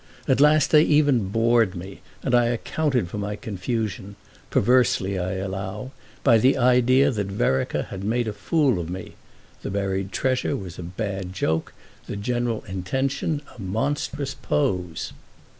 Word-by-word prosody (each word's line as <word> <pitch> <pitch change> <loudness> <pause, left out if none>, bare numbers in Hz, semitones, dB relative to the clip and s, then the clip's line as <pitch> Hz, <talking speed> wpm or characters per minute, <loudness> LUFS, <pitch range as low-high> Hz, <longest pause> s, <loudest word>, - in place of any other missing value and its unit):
At 130 +1 +3
last 150 0 +5
they 150 - +7
even 145 -9 +3
bored 115 -2 +3
me, 95 +2 -8 0.2
and 130 - -1
I 120 -1 +5
accounted 125 - 0
for 105 - -5
my 105 0 -3
confusion—perversely, 100 0 -1
I 90 +1 -2
allow—by 100 +5 -1
the 130 +5 +4
idea 125 +2 +4
that 105 -5 -2
Vereker 95 -9 0
had 95 0 -7
made 115 +3 0
a 110 - -2
fool 130 - +1
of 85 -1 -5
me. 95 +1 -6 0.5
The - - -4
buried 95 -1 -2
treasure 130 -1 0
was 90 -3 -8
a - - -4
bad 95 +1 -4
joke, 80 -3 -1 0.3
the - - -4
general 120 +2 -1
intention 135 - -2
a 120 - -10
monstrous 135 +7 -2
pose. 85 +2 -1
105 Hz, 140 wpm, -24 LUFS, 95-130 Hz, 0.5 s, they